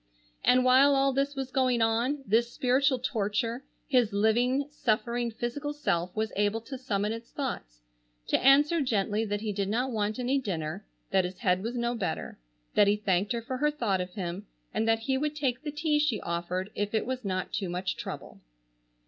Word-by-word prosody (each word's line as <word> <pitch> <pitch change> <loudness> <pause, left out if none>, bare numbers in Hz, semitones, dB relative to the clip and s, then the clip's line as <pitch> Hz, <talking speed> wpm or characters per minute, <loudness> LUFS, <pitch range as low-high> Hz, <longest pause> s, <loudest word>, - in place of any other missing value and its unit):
And 255 0 +4
while 270 +3 +6
all 275 0 +3
this 275 +2 0
was 265 -1 -4
going 255 -2 +2
on, 235 +5 +1
this 235 +3 +2
spiritual 260 +2 +2
torture, 230 0 -1 0.2
his 250 -6 +3
living, 240 +6 +2
suffering, 235 -2 0
physical 245 +6 -4
self 180 -11 -1
was 220 0 -1
able 205 +2 +1
to 265 +4 -7
summon 210 -4 -1
its 230 +1 -8
thoughts, - - -5 0.4
to - - +1
answer 290 +5 +5
gently 220 -3 0
that 205 -1 -2
he 215 -2 -2
did 200 -1 -1
not 250 +5 0
want 215 -1 -1
any 255 +2 +1
dinner; 180 -4 -4 0.2
that 190 -1 +4
his 180 +1 -5
head 185 -5 +1
was 235 +4 -3
no 235 0 0
better; 230 - -4 0.3
that 205 - +5
he 205 - +4
thanked 200 0 0
her 235 -1 -3
for 255 +2 -4
her 300 +3 +2
thought 230 -11 0
of 180 0 -7
him; 190 +1 -4 0.3
and 220 +1 0
that 225 0 +3
he 265 +3 0
would 300 +1 -1
take 260 -4 -1
the 300 - -4
tea 300 0 +1
she 290 -8 +1
offered 175 +3 -3
if 205 +2 -2
it 220 - +1
was 255 0 -3
not 185 -2 -3
too 190 -3 -2
much 180 +2 -2
trouble. - - -7
230 Hz, 195 wpm, -29 LUFS, 205-265 Hz, 0.4 s, while